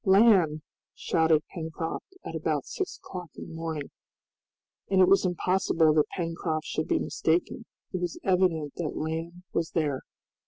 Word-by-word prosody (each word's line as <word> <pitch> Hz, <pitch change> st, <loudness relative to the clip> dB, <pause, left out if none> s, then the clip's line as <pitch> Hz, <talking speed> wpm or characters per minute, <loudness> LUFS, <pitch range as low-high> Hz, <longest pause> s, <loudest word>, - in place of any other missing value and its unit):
"Land!" 190 Hz, -7 st, +5 dB, 0.3 s
shouted 160 Hz, -2 st, +2 dB
Pencroft 165 Hz, -, -5 dB
at -, -, -5 dB
about -, -, -1 dB
six 385 Hz, -2 st, -4 dB
o'clock 180 Hz, -3 st, -8 dB
in -, -, -8 dB
the -, -, -9 dB
morning. 160 Hz, -3 st, -4 dB, 1.0 s
And 190 Hz, -1 st, +3 dB
it 185 Hz, -, +7 dB
was 195 Hz, -1 st, +5 dB
impossible 175 Hz, -3 st, +2 dB
that 150 Hz, -1 st, +3 dB
Pencroft 165 Hz, -2 st, -2 dB
should 155 Hz, -, -2 dB
be -, -, +2 dB
mistaken, 175 Hz, +8 st, 0 dB, 0.3 s
it 185 Hz, -, -2 dB
was 175 Hz, -2 st, -2 dB
evident 180 Hz, -6 st, +2 dB
that 170 Hz, -3 st, -3 dB
land 165 Hz, +3 st, -4 dB
was 165 Hz, -1 st, 0 dB
there. 150 Hz, -5 st, +1 dB
165 Hz, 150 wpm, -28 LUFS, 160-185 Hz, 1.0 s, it